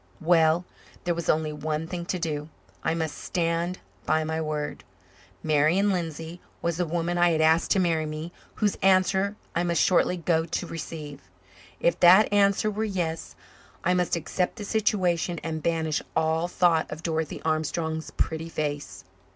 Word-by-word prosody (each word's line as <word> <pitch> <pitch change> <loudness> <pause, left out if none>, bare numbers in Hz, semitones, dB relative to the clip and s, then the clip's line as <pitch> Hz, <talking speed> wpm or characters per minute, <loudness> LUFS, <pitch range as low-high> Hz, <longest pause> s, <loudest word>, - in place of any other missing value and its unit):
Well, 165 +1 +3 0.4
there 175 - +1
was 170 -1 -4
only 155 -1 +1
one 155 +1 -3
thing 170 0 -5
to 185 - -1
do. 155 -3 -3 0.3
I 165 - +1
must 160 -2 -2
stand 170 +1 -1 0.3
by 155 - +1
my 160 +1 -2
word. 150 -1 -3 0.6
Marian 160 +7 +3
Lindsay 165 -1 -4 0.2
was 170 -1 -1
the 175 -1 0
woman 175 +2 -1
I 175 0 +5
had 160 -2 +1
asked 160 +1 +4
to 195 - +3
marry 165 -3 +1
me, 155 +2 -5 0.2
whose 210 -2 0
answer 190 +1 +3 0.2
I 170 - +2
must 170 -1 +1
shortly 180 0 +3
go 165 -1 +1
to 170 +2 -3
receive. 155 -4 -7 0.6
If 170 - +1
that 185 +4 +7
answer 200 +1 +3
were 215 +1 -2
"yes" 175 -6 -3 0.5
I 180 - +3
must 180 -1 +1
accept 175 +2 -2
the 210 -3 -6
situation 185 -5 +1
and 160 -1 -3
banish 160 -1 0
all 160 +2 +1
thought 175 -3 +2
of 155 +2 -7
Dorothy 160 -2 -2
Armstrong's 160 0 -1
pretty 160 +1 -2
face. 145 - -4
165 Hz, 160 wpm, -26 LUFS, 160-180 Hz, 0.6 s, that